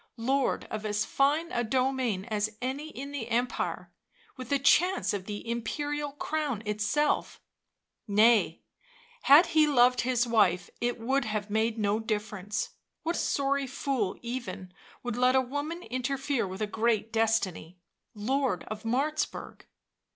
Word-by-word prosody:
— - - -51
lord 265 +4 +1
of 215 0 -4
as 210 0 0
fine 300 +5 +1
a 240 - 0
domain 255 -4 0
as 215 -1 -2
any 270 +5 -3
in 280 0 -7
the 270 -6 -4
empire, 245 +2 -1 0.4
with 255 -1 -8
a 280 - +4
chance 350 - +3
of 195 -2 -3
the 205 +2 -6
imperial 290 +6 -2
crown 290 -6 -2
itself 210 +8 0 0.3
— - - -56 0.2
nay, 215 +2 +4 0.6
had 290 +6 +8
he 310 -1 +5
loved 250 -3 +4
his 245 -1 +1
wife 200 -7 +2
it 240 0 -1
would 265 +3 0
have 210 -1 -3
made 220 +1 +1
no 210 0 +1
difference; 210 -2 -3 0.3
what 335 +2 -1
sorry 280 0 0
fool 255 -6 -2
even 235 -7 -5 0.3
would 245 -2 -3
let 250 +1 +4
a - - +6
woman 290 +7 -3
interfere 260 +1 -1
with 190 +3 -4
a - - +2
great 225 +1 0
destiny 215 -6 0 0.2
— - - -54
Lord 245 -2 0
of 215 0 -5
Martzburg. 280 +7 -2
240 Hz, 150 wpm, -29 LUFS, 215-275 Hz, 0.6 s, had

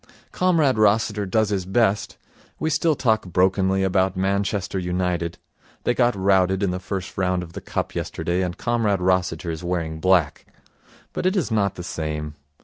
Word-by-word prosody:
Comrade 160 -10 +2
Rossiter 105 -1 +2
does 110 +2 +1
his 100 -3 -1
best. 105 0 +1 0.4
We 160 - -1
still 155 +1 +2
talk 110 -7 +1
brokenly 95 +2 +2
about 95 0 +1
Manchester 100 0 -1
United 90 -1 -2 0.5
they 120 - +2
got 120 -2 +2
routed 95 0 +2
in 95 - +1
the 90 - -3
first 95 0 -5
round 90 -1 +1
of 85 -1 -11
the - - -7
Cup - - -3
yesterday 90 +2 -2
and 90 -1 -3
Comrade 115 -5 0
Rossiter 90 -1 0
is 80 +1 -6
wearing 85 -3 -2
black 90 -3 +2 0.7
but 180 - -1
it 185 - +1
is 170 - 0
not 100 -3 +1
the 90 - -7
same. 75 -3 -4
95 Hz, 165 wpm, -23 LUFS, 90-110 Hz, 0.7 s, Comrade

